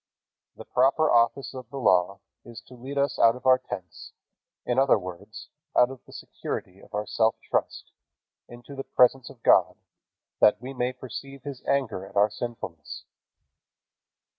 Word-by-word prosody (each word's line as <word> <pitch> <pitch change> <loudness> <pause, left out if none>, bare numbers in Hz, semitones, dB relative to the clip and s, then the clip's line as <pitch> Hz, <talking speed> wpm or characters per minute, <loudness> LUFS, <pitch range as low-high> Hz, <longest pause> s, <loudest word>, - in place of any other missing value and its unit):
The - - -11
proper 135 +5 +2
office 120 +4 +2
of 130 -3 -9
the 140 - -7
Law 95 -4 +2 0.2
is 120 -2 -10
to 130 - -17
lead 130 +3 -8
us 140 -2 0
out 115 0 +6
of 125 - -12
our 130 0 +6
tents, 90 - -9 0.5
in 125 +1 +1
other 135 -3 +5
words, 90 -3 -9 0.3
out 125 +1 +5
of 135 - -11
the - - -15
security 95 +1 -7
of - - -11
our 105 0 -2
self 110 +1 +1
trust, - - -3 0.6
into 120 +4 -12
the 135 - -5
presence 125 0 +3
of 130 -4 -16
God, - - +4 0.6
that 105 0 +5
we 130 +3 -7
may 125 -1 -1
perceive 135 +2 -9
His 140 -3 -7
anger 115 -9 0
at 95 - -13
our 105 +1 +4
sinfulness. 105 -9 -7
120 Hz, 165 wpm, -26 LUFS, 105-135 Hz, 0.6 s, out